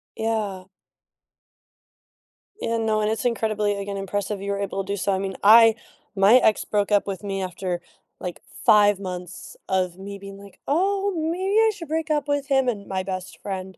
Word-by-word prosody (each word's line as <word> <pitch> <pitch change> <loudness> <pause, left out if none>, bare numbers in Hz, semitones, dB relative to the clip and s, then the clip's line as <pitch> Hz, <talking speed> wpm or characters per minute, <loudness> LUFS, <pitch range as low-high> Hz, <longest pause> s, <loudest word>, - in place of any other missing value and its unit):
Yeah. 215 -4 -2 2.0
Yeah, 230 0 -1
no, 220 -1 +1
and 210 - +1
it's 220 0 -2
incredibly, 215 -3 0
again, 200 0 -4
impressive 195 +1 -3
you 200 0 -3
were 200 - -2
able 195 -1 -2
to 200 +1 -4
do - - -3
so, 195 +1 0
I 190 - 0
mean, 190 -1 -4
I 225 +2 +8 0.4
my 195 +4 +6
ex 220 -4 +4
broke 205 -1 0
up 205 -1 +3
with 195 0 -5
me 195 -1 -3
after, 180 -1 -3 0.4
like, 180 -1 -6 0.2
5 205 -1 +5
months 180 -1 -7
of 185 -2 0
me 200 +1 -7
being 195 0 -10
like, 200 -1 -15
"Oh, 390 +6 +1 0.2
maybe 380 +4 -1
I 445 0 +5
should 340 -5 -9
break 320 +1 -2
up 295 -2 0
with 285 -1 -1
him," 270 -2 +2
and 205 -5 -2
my 190 -1 -2
best 185 -1 -6
friend 190 -1 -6
200 Hz, 185 wpm, -24 LUFS, 195-230 Hz, 2.0 s, I